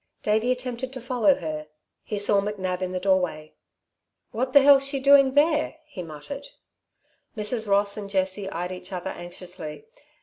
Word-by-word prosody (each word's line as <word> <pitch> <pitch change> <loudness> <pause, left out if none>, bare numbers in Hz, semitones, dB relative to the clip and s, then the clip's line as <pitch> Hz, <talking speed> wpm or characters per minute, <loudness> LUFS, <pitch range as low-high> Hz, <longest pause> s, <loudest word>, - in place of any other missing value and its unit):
Davey 220 +4 +1
attempted 250 0 -4
to 260 - -6
follow 240 -6 +2
her. 155 -2 -5 0.3
He 210 - -5
saw 205 0 +3
McNab 190 -3 -3
in 185 -1 -2
the 185 - -2
doorway. 180 -5 0 0.8
"What 255 +3 -2
the 280 +1 +7
hell's 275 -1 +7
she 275 0 -1
doing 275 0 +5
there?" 305 +1 +2
he 290 -11 -8
muttered. 180 - -8 0.9
Mrs. 215 +1 +1
Ross 200 +1 +4
and 200 -1 -6
Jessie 190 0 -1
eyed 180 +1 -4
each 185 +2 -8
other 185 0 -4
anxiously. 175 -3 -9
205 Hz, 160 wpm, -25 LUFS, 185-255 Hz, 0.9 s, the